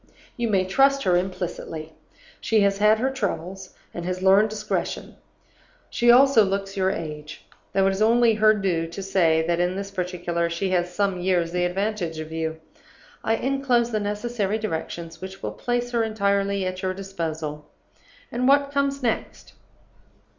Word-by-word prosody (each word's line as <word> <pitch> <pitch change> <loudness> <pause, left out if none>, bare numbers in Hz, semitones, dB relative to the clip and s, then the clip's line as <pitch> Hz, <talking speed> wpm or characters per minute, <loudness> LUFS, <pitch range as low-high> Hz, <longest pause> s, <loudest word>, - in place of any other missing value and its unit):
You 240 -1 -1
may 195 -4 +2
trust 275 +8 +3
her 180 - +3
implicitly. 175 -3 -4 0.5
She 220 -2 +2
has 200 0 +2
had 210 +1 +5
her 260 +4 0
troubles, 190 -6 -4 0.2
and 175 - -5
has 185 +1 -3
learned 195 +3 +5
discretion. 215 0 -3 0.8
She 240 - +2
also 250 -1 +7
looks 195 0 -2
your 190 -1 +1
age; 150 -5 -6 0.3
though 195 -1 +2
it 195 - +3
is 195 +2 -3
only 230 +1 +4
her 215 0 +4
due 180 -5 -1
to 170 +4 -7
say 165 -4 +2
that, 170 0 0
in 180 +1 +1
this 195 0 -5
particular, 175 -2 -2
she 175 +3 -2
has 180 -1 +1
some 195 0 0
years 175 -2 +1
the 180 0 0
advantage 185 -2 -2
of 155 0 -7
you. 160 0 -3 0.6
I 225 - +2
inclose 255 -2 +1
the 215 - 0
necessary 210 0 -2
directions 165 -4 -5
which 190 +1 -8
will - - -2
place 245 0 -2
her 235 -1 +1
entirely 200 -2 0
at 185 0 -4
your 185 -1 -2
disposal. 160 -6 -5 0.6
"And 250 +2 0
what 280 0 +4
comes 280 -1 0
next? 230 -2 -3
195 Hz, 165 wpm, -24 LUFS, 175-220 Hz, 0.8 s, also